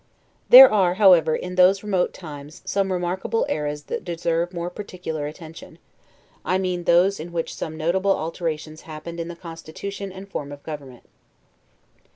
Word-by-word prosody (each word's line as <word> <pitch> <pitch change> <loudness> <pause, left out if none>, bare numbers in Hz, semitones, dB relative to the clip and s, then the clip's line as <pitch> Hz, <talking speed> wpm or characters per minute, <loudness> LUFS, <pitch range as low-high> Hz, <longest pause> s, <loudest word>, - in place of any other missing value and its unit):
There 265 +2 +12
are, 185 -4 +3
however, 180 -6 +5
in 180 - -5
those 185 +2 +4
remote 190 -4 0
times, 150 -2 -11
some 195 -1 0
remarkable 185 +5 -1
eras 150 -1 -3
that - - -5
deserve 170 0 -1
more 175 0 -4
particular 180 -6 -5
attention; 160 +1 -11 0.7
I 185 - +1
mean 180 -2 -2
those 180 +4 +4
in 170 +2 -7
which 165 -1 -3
some 160 0 -6
notable 190 +5 +1
alterations 155 -1 -4
happened 170 +2 -8
in 165 - -4
the 175 - -7
constitution 170 +4 -8
and 190 +1 -10
form 145 -7 -6
of 145 0 -10
government. 140 -6 -9
170 Hz, 155 wpm, -23 LUFS, 155-185 Hz, 0.7 s, There